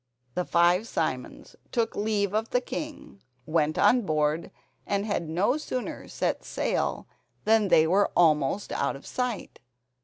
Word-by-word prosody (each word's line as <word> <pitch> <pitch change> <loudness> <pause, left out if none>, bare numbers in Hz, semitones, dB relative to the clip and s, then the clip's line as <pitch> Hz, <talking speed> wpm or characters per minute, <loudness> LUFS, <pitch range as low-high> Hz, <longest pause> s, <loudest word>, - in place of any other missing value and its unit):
The 180 - -1
five 175 +5 +3
Simons - - -3 0.2
took 230 -2 0
leave 205 -2 0
of 220 +1 0
the 250 - +2
king, 275 - -7 0.2
went 155 -1 +1
on 225 +5 +5
board, 155 -3 0 0.4
and 200 0 0
had 175 -6 -2
no 200 - +1
sooner 255 -5 -5
set - - -2
sail - - -1 0.4
than 220 -1 +4
they 160 -4 +5
were 195 +5 +3
almost 155 +2 +3
out 140 - -1
of 135 - -12
sight. 250 -4 -3
200 Hz, 145 wpm, -27 LUFS, 160-225 Hz, 0.4 s, on